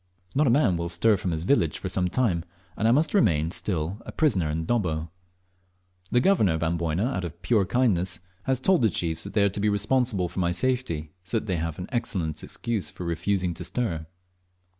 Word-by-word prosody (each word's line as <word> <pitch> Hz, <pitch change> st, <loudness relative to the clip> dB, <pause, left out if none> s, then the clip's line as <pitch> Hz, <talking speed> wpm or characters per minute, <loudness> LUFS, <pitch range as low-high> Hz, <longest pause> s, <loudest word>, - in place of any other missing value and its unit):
Not 145 Hz, +1 st, +3 dB
a -, -, +5 dB
man 115 Hz, -, +3 dB
will 85 Hz, 0 st, -3 dB
stir 105 Hz, +6 st, +3 dB
from 95 Hz, -, -3 dB
his 80 Hz, -1 st, -2 dB
village 85 Hz, -, +2 dB
for -, -, -5 dB
some 90 Hz, -1 st, 0 dB
time, 90 Hz, -5 st, +1 dB, 0.3 s
and 110 Hz, -, +1 dB
I -, -, +5 dB
must 150 Hz, +5 st, +2 dB
remain 80 Hz, -, +3 dB
still 90 Hz, +2 st, -2 dB
a -, -, -8 dB
prisoner 100 Hz, -, +1 dB
in 80 Hz, +2 st, -2 dB
Dobbo. 80 Hz, -8 st, -1 dB, 1.0 s
The 120 Hz, -, +3 dB
Governor 125 Hz, -, +3 dB
of 80 Hz, 0 st, -2 dB
Amboyna, 85 Hz, +3 st, 0 dB
out 125 Hz, -8 st, -2 dB
of 85 Hz, 0 st, -6 dB
pure 110 Hz, -5 st, +3 dB
kindness, 95 Hz, -8 st, +1 dB, 0.3 s
has 130 Hz, -1 st, +1 dB
told 180 Hz, +3 st, +3 dB
the 110 Hz, -, +4 dB
chiefs 80 Hz, -2 st, -2 dB
that -, -, -7 dB
they 105 Hz, -1 st, +3 dB
are 100 Hz, -, +4 dB
to 100 Hz, -, -6 dB
be 105 Hz, +1 st, +2 dB
responsible 105 Hz, -1 st, +1 dB
for 90 Hz, -, -6 dB
my 85 Hz, -1 st, +1 dB
safety, 90 Hz, -8 st, -1 dB
so 95 Hz, +5 st, -2 dB
that -, -, -3 dB
they 95 Hz, -5 st, -1 dB
have 80 Hz, 0 st, -3 dB
au 90 Hz, -, -4 dB
excellent 95 Hz, -, -2 dB
excuse 115 Hz, -5 st, -3 dB
for 90 Hz, -, -8 dB
refusing 90 Hz, +2 st, 0 dB
to -, -, -7 dB
stir. 85 Hz, -11 st, -2 dB
95 Hz, 210 wpm, -26 LUFS, 85-120 Hz, 1.0 s, a